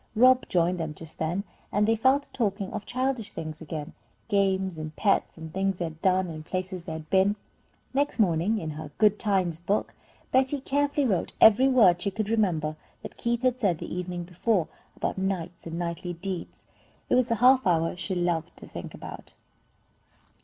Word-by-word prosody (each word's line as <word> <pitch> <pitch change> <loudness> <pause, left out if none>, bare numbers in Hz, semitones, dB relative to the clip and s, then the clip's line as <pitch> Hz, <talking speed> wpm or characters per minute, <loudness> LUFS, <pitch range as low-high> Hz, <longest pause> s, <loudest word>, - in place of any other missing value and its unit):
Rob 255 +3 +5
joined 175 0 +2
them 160 -2 -3
just 160 0 -10
then, 170 +5 -1 0.3
and 210 +1 +2
they 225 - +4
fell 260 +5 +4
to 285 - -21
talking 200 -4 -2
of - - -5
childish 255 -4 -2
things 155 -1 -6
again, 155 -2 -6 0.4
games 190 -3 +1
and 155 -1 -6
pets, 200 -4 +1
and 160 -1 -9
things 195 0 0
they 175 - -2
had 160 -1 -8
done, 185 0 +3
and 155 -2 -7
places 185 +2 -4
they 160 - -5
had 160 -1 -7
been. 195 +2 +4 0.6
Next 285 +2 +1
morning 195 +1 +2
in 160 -6 -4
her 155 0 -7
"Good 210 -1 +4
times" 185 -6 0
book, 200 +5 -1 0.4
Betty 265 +2 +2
carefully 285 +1 +1
wrote 195 -8 0
every 225 +5 +7
word 210 -10 +5
she 200 - +1
could 215 +2 -3
remember 165 -9 +1 0.3
that - - -8
Keith 235 +1 -1
had 255 -1 +2
said 190 -8 +2
the - - -6
evening 180 -1 -4
before, 180 +1 0 0.3
about - - -2
knights 180 -3 -3
and 165 0 -5
knightly 175 +1 -3
deeds. 180 +1 -6 0.4
It - - 0
was 255 -1 +3
a 230 - +2
half 255 +1 +5
hour 165 -2 +3
that 180 - -8
she 185 +2 -2
loved 175 -2 -1
to - - -10
think - - -8
about. - - -9
190 Hz, 190 wpm, -27 LUFS, 170-225 Hz, 0.6 s, every